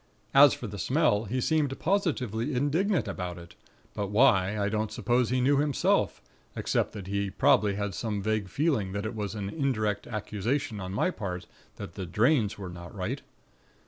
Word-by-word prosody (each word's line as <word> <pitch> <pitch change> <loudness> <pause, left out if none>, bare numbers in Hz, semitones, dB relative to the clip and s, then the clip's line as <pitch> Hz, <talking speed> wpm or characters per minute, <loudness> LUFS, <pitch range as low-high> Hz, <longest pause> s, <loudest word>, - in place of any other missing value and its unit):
As 140 -1 +8
for - - -7
the 100 -2 -6
smell, 120 - +2
he 125 +6 -2
seemed 145 0 +1
positively 145 - 0
indignant 145 - +1
about 90 -3 -4
it; 85 -1 -12 0.4
but 100 - -2
why, 105 -3 +3
I 100 -1 +1
don't 110 0 -1
suppose 120 +2 +1
he 125 0 +1
knew 140 +3 +4
himself, 145 -1 +1 0.3
except - - 0
that 100 -4 -7
he 100 +1 -1
probably 100 +1 +3
had 100 -1 -2
some 105 +1 -2
vague 105 -1 -1
feeling 135 - 0
that 100 +1 -3
it 110 - -3
was 105 -2 -4
an 100 -2 -3
indirect 110 -9 -1
accusation 110 +2 -2
on 95 -1 -5
my 105 - +1
part 90 - -5 0.3
that - - -8
the 95 - -6
drains 110 - +2
were 100 -2 -6
not 85 0 -10
right. - - -3
110 Hz, 175 wpm, -28 LUFS, 100-135 Hz, 0.4 s, As